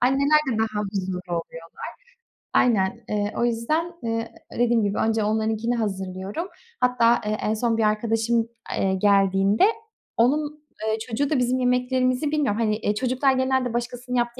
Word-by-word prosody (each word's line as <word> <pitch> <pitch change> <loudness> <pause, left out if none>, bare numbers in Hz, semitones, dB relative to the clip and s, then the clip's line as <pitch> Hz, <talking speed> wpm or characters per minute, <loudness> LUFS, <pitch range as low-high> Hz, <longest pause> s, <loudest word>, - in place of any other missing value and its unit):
Anneler 275 +4 +4
de 220 - -2
daha 215 -2 0
huzurlu 190 -2 -2
oluyorlar. 165 -1 -6 0.7
Aynen. 225 -1 +2
Eee, 205 0 -1
o 235 - +2
yüzden, 305 +10 -1
ııı, 230 0 -1 0.3
dediğim 235 -2 +3
gibi 200 0 -1
önce 220 -1 +1
onlarınkini 220 +2 0
hazırlıyorum. 195 - -3 0.3
Hatta, 240 -2 +3
eee, 215 0 -1
en 215 - 0
son 230 0 0
bir 225 - +2
arkadaşım, 225 +2 +1 0.3
eee, 190 0 +1
geldiğinde 195 - +3 0.5
onun, 295 +5 +1 0.2
eee, 220 - +1
çocuğu 255 +4 -1
da 300 - +1
bizim 250 +1 +1
yemeklerimizi 255 +3 +1
Bilmiyorum, 275 -8 0
hani, 215 -1 +1
eee, 210 -2 -1
çocuklar 260 +3 +1
genelde 260 -2 0
başkasının 245 +1 -3
yaptığı 240 +1 -1
230 Hz, 150 wpm, -24 LUFS, 210-250 Hz, 0.7 s, Anneler